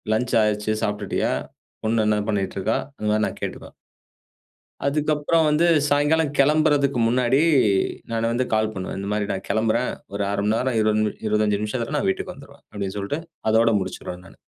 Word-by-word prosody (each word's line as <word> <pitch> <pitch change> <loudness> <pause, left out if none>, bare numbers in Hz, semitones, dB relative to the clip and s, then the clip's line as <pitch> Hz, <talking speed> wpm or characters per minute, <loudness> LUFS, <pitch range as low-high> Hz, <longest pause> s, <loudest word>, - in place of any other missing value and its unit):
Lunch 125 +2 -1
ஆயிருச்சு, 105 0 0
சாப்ட்டுட்டியா? 105 0 -1 0.5
பொண்ணு 110 0 +1
என்ன 105 0 +2
பண்ணிட்ருக்கா?" 100 +1 -1 0.2
அந்த 105 - -3
மாரி 110 0 +2
நான் - - -8
கேட்டுப்பேன். - - -6 1.1
அதுக்கப்பறம் 150 +2 +1
வந்து 150 +3 +3 0.2
சாயங்காலம் 145 +1 +2
கெளம்புறதுக்கு 145 -2 +3
முன்னாடி, 125 +3 +2 0.7
நானு 115 0 0
வந்து 125 +2 0
கால் 110 0 +1
பண்ணுவேன். 95 0 -5
இந்த 100 - -4
மாரி 105 -1 -1
நான் 95 - -5
கெளம்புறேன். 110 +1 +1 0.2
ஒரு 100 0 -1
1/2 100 0 -1
மணிநேரம் 115 +3 +1
20 110 0 +2
நிமி, 105 -1 0
25 105 -1 +1
நிமிஷத்ல 120 +6 -2
நான் 195 - 0
வீட்டுக்கு 190 -1 -2
வந்துருவேன் 140 -1 -16
அப்டின்னு 100 -2 -4
சொல்லிட்டு, 100 +10 -3 0.3
அதோட 115 +1 +4
முடிச்சிருவேன் 90 -1 -6
நானு. - - -16
110 Hz, 155 wpm, -23 LUFS, 105-140 Hz, 1.1 s, அதோட